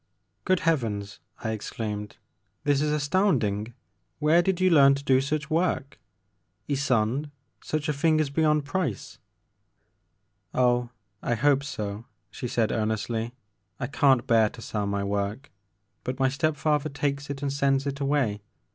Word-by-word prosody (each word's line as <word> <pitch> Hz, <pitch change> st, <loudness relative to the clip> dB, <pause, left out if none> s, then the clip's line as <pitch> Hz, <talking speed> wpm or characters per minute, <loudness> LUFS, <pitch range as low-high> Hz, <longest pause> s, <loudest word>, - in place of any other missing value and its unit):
Good 185 Hz, -2 st, +2 dB
Heavens! 110 Hz, -11 st, -1 dB
" -, -, -21 dB
I 110 Hz, -, -1 dB
exclaimed, 105 Hz, -1 st, -5 dB, 0.5 s
this 145 Hz, -1 st, +2 dB
is 150 Hz, 0 st, +1 dB
as 150 Hz, -1 st, 0 dB
tounding! 120 Hz, -, +1 dB, 0.4 s
Where 155 Hz, +3 st, +4 dB
did 185 Hz, 0 st, 0 dB
you 185 Hz, -1 st, +4 dB
learn 140 Hz, -3 st, +7 dB
to 140 Hz, -, -6 dB
do 130 Hz, -2 st, +4 dB
such 150 Hz, +2 st, -2 dB
work? 160 Hz, -4 st, 0 dB, 0.7 s
Ysonde, 135 Hz, 0 st, +1 dB, 0.3 s
such 155 Hz, 0 st, -2 dB
a 150 Hz, -, +1 dB
thing 155 Hz, +2 st, +2 dB
is 150 Hz, -3 st, 0 dB
beyond 150 Hz, -1 st, +2 dB
price! 145 Hz, -, -3 dB, 0.7 s
" -, -, -47 dB
Oh, 125 Hz, -1 st, +2 dB, 0.3 s
I 120 Hz, -, 0 dB
hope 140 Hz, +3 st, +3 dB
so," 105 Hz, -6 st, -5 dB, 0.3 s
she 125 Hz, -, -5 dB
said 115 Hz, -2 st, +1 dB
earnestly, 110 Hz, +2 st, -2 dB, 0.4 s
I 130 Hz, -, -1 dB
can't 135 Hz, -1 st, +3 dB
bear 110 Hz, -2 st, +4 dB
to 115 Hz, -, -12 dB
sell 105 Hz, -2 st, -2 dB
my 100 Hz, 0 st, -1 dB
work, 100 Hz, +6 st, -3 dB, 0.5 s
but 125 Hz, 0 st, -3 dB
my 130 Hz, 0 st, +3 dB
step 145 Hz, +3 st, 0 dB
father 150 Hz, 0 st, +1 dB
takes 140 Hz, 0 st, -2 dB
it 140 Hz, 0 st, -5 dB
and 140 Hz, -1 st, -1 dB
sends 140 Hz, 0 st, +1 dB
it 140 Hz, 0 st, -3 dB
away. 135 Hz, -7 st, 0 dB
140 Hz, 155 wpm, -26 LUFS, 115-150 Hz, 0.7 s, learn